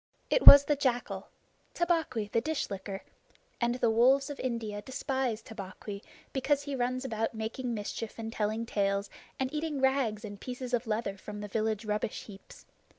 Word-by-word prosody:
It - - +2
was 280 0 +13
the 295 - +2
jackal 255 -3 -1 0.5
Tabaqui, 320 -12 0
the 230 - +3
Dish 310 -3 -2
licker 195 0 -5 0.6
and 240 0 +2
the 235 -2 +2
wolves 265 +5 +4
of 285 - -8
India 225 -5 -3
despise 260 -1 -2
Tabaqui 200 -1 -8 0.3
because 280 +1 +1
he 285 -1 -3
runs 255 +1 -1
about 225 -2 -2
making 230 +2 -3
mischief, 215 +1 -5
and 225 0 -5
telling 220 +2 -1
tales, 200 -2 0 0.3
and 265 +1 -1
eating 305 -2 -2
rags 265 -5 +1
and 205 -1 -9
pieces 250 0 -6
of 240 0 0
leather 215 -2 -1
from 210 +2 -8
the 210 - -5
village 220 +1 -1
rubbish 210 +1 -2
heaps. 200 -2 -13
230 Hz, 165 wpm, -30 LUFS, 210-265 Hz, 0.6 s, was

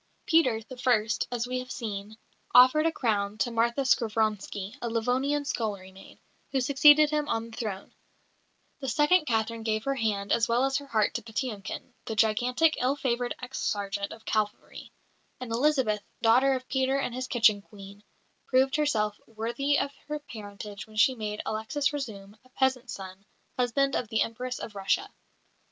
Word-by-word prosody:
Peter, 255 -10 +3
the 255 +3 -11
first, 235 -3 +1
as 240 -1 -1
we 255 +1 -2
have 250 0 -8
seen, 215 -2 -5 0.4
offered 260 +6 +7
a - - +2
crown 210 -7 -1
to 225 +4 0
Martha 235 +3 +1
Skovronski, 215 -4 0
a 235 - -2
Livonian 255 +6 0
scullery 205 -8 -3
maid, 190 +1 -15 0.3
who 270 - +1
succeeded 295 +3 +6
him 300 -1 0
on 230 0 -2
the - - -10
throne; 205 -5 -5 0.9
the 270 - -5
second 300 +7 +3
Catherine 225 0 0
gave 215 -1 -1
her 275 - 0
hand 215 -6 -1
as 235 0 +3
well 240 +3 +2
as 270 0 +1
her 285 -1 -7
heart 215 -5 +1
to 235 - -3
Patiomkin, 225 0 -5
the 220 - -4
gigantic, 245 +8 +2
ill 260 +3 +2
favoured 245 -3 -1
ex 250 +2 -5
sergeant 200 -1 -2
of 225 - -11
cavalry; 215 -1 -3 0.5
and 255 -3 -6
Elizabeth, 245 -4 +2 0.2
daughter 255 +4 +5
of 255 0 -6
Peter 265 +1 +1
and 275 -3 -2
his 255 +1 -4
kitchen 225 -5 +4
Queen, 200 0 -13 0.4
proved 265 +2 +3
herself 215 -9 0
worthy 235 +6 -1
of 280 - -1 0.2
her 300 0 -2
parentage 210 -7 -9
when 215 - -16
she 255 +4 +5
made 210 -3 -4
Alexis 220 +7 -1
Razoum, 210 -8 -6
a 255 - -23
peasant's 255 -1 0
son, 190 0 -10 0.3
husband 270 +3 +1
of 245 - -1
the 220 0 +2
Empress 250 +2 -5
of 220 - -7
Russia. 200 - -1
235 Hz, 170 wpm, -28 LUFS, 215-265 Hz, 0.9 s, offered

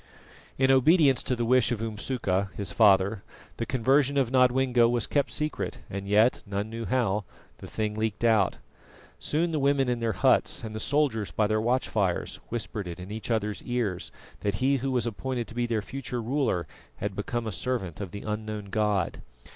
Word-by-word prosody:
In 130 0 +4
obedience 135 0 +5
to 125 - -1
the 120 -1 -1
wish 125 0 +3
of 120 - -1
Umsuka 105 -3 -1
his 100 - -3
father, 100 -1 +4 0.4
the 115 - -3
conversion 135 +3 +2
of 130 -4 +2
Nodwengo 125 -2 +4
was 120 -2 +1
kept 145 -1 0
secret, 150 -1 -3
and 100 0 -5
yet 105 +4 +4
none 100 +2 -3
knew 115 0 -5
how 110 -5 0 0.4
the - - -9
thing 105 -1 -2
leaked 110 0 -2
out. 110 -4 +3 0.6
Soon 165 +3 0
the 155 - 0
women 140 -1 +2
in 120 -1 0
their 115 -1 0
huts, - - +2
and 110 -1 -6
the 110 - -4
soldiers 135 -5 +1
by 110 - +1
their 110 +1 +1
watch 125 +3 +1
fires, 95 -5 -1
whispered 110 -4 -4
it 85 0 -7
in 90 +2 -8
each 110 +2 -5
other's 105 -2 -1
ears 115 -7 -2 0.3
that 100 -1 -1
he 135 +6 +2
who 135 +1 -2
was 125 -3 +1
appointed 120 +1 -3
to - - -9
be 120 0 -1
their 110 -3 -1
future 125 0 -5
ruler 120 - 0 0.3
had 100 -1 -4
become 115 +4 -3
a 110 - -2
servant 95 -3 -3
of 100 - -4
the 100 +3 -8
unknown 105 -1 -4
God. 105 -4 0
115 Hz, 190 wpm, -27 LUFS, 105-130 Hz, 0.6 s, obedience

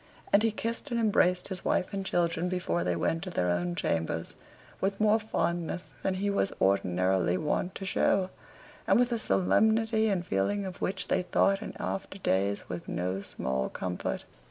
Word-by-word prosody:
And 200 - +7
he 225 - +3
kissed 230 +5 -3
and 235 -2 0
embraced 185 -5 +2
his 190 -2 -5
wife 185 - 0
and 195 -1 -2
children 175 -1 0
before 130 - -1
they 90 -1 0
went 165 - 0
to - - -4
their 90 - 0
own 90 0 -1
chambers 80 0 -1 0.5
with 195 +1 -1
more 215 +1 +4
fondness 170 -4 -2
than 190 - 0
he 195 +2 -1
was 200 -1 +1
ordinarily 95 -2 +2
wont 175 - -1
to 195 - -5
show, 185 0 +2 0.6
and - - +5
with 245 0 +3
a 235 - +1
solemnity 220 +2 +3
and 185 -3 0
feeling 135 - 0
of 185 -1 -7
which 190 - -1
they 185 - +2
thought 195 +2 +2
in - - -6
after 195 0 -4
days 100 - 0
with 85 - -6
no 90 +2 -2
small 65 -8 -2
comfort. 90 -1 -3
180 Hz, 180 wpm, -29 LUFS, -, 0.6 s, And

